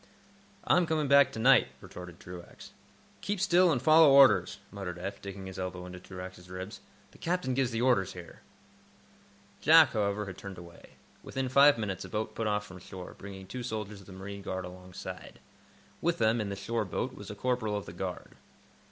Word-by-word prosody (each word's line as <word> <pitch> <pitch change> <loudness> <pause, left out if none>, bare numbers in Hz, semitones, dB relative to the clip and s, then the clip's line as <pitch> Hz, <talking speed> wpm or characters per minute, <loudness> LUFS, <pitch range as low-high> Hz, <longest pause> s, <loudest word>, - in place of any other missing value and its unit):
"I'm 180 -2 +3
coming 155 -2 0
back 140 +1 +6
to - - -7
night," 130 +3 +5
retorted 90 -1 -10
Truax. 90 -1 -11 0.5
"Keep 205 -1 -2
still, 180 -1 +4
and 135 - +1
follow 155 +3 +7
orders," 130 -10 +6
muttered 95 -4 -6
Eph, 95 +3 -6
digging 100 -1 -7
his 95 -1 -8
elbow 90 -1 -4
into 90 0 -9
Truax's 90 -1 -10
ribs. 95 +4 -7 0.3
"The - - -19
captain 175 -6 -1
gives 130 -1 +1
the 115 0 -1
orders 105 -7 +2
here." 85 -2 -11 1.2
Jack, 160 -2 +7
however, 105 -1 0
had 95 -1 -8
turned 100 -2 -8
away. 85 -1 -13 0.3
Within 130 -1 -3
five 140 +1 +6
minutes 100 -4 -3
a - - -9
boat 110 0 -3
put 115 - -2
off 105 0 0
from 95 -2 -11
shore, 90 0 -9
bringing 95 -1 -9
two 125 +7 -6
soldiers 105 -4 -5
of - - -17
the 95 - -11
marine 100 +1 -7
guard 95 -1 -4
alongside. 90 0 -9 0.6
With 170 0 +1
them, 110 0 +2
in 105 - -3
the 100 - -3
shore 110 +3 -2
boat, 125 +7 -3
was 100 -5 -10
a 105 - -6
corporal 110 -2 -1
of 100 - -6
the - - -9
guard. - - -5
105 Hz, 190 wpm, -30 LUFS, 95-130 Hz, 1.2 s, follow